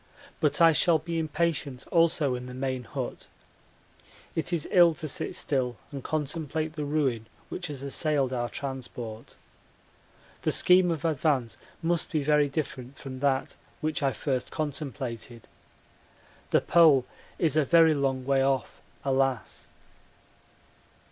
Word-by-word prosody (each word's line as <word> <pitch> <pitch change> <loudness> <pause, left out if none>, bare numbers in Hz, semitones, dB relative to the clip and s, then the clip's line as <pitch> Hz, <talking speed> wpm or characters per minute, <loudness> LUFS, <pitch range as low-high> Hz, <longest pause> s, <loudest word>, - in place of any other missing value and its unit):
But - - +1
I 165 -1 +8
shall 165 +1 +4
be 165 +2 -3
impatient 155 -4 -1
also 165 -5 +3
in 125 0 -5
the 125 - -8
main 130 -1 -3
hut. - - -5 1.1
It 165 +2 -1
is 170 -4 -1
ill 175 -3 +6
to 160 -1 -5
sit 140 - -3
still 125 -4 -1
and 140 -3 -6
contemplate 155 +1 -2
the 150 -2 -4
ruin 135 -7 0 0.2
which 180 - -5
has 140 -3 -6
assailed 140 -1 0
our 120 -1 -1
transport. 120 -5 -6 1.1
The - - +1
scheme 180 0 +5
of 165 -2 -2
advance 145 -6 0 0.2
must 170 0 0
be 155 -3 0
very 150 0 +3
different 135 -2 -5
from 130 -1 -8
that 135 -1 0 0.2
which 155 0 -2
I 135 -1 +2
first 130 -2 -2
contemplated. 130 -6 -5 1.0
The - - +4
Pole 155 -7 +5 0.3
is 160 -3 +1
a 155 - +4
very 165 +2 +5
long 135 -3 -1
way 135 0 +3
off, 135 -2 -1 0.2
alas! 135 -3 0
140 Hz, 135 wpm, -28 LUFS, 130-160 Hz, 1.1 s, I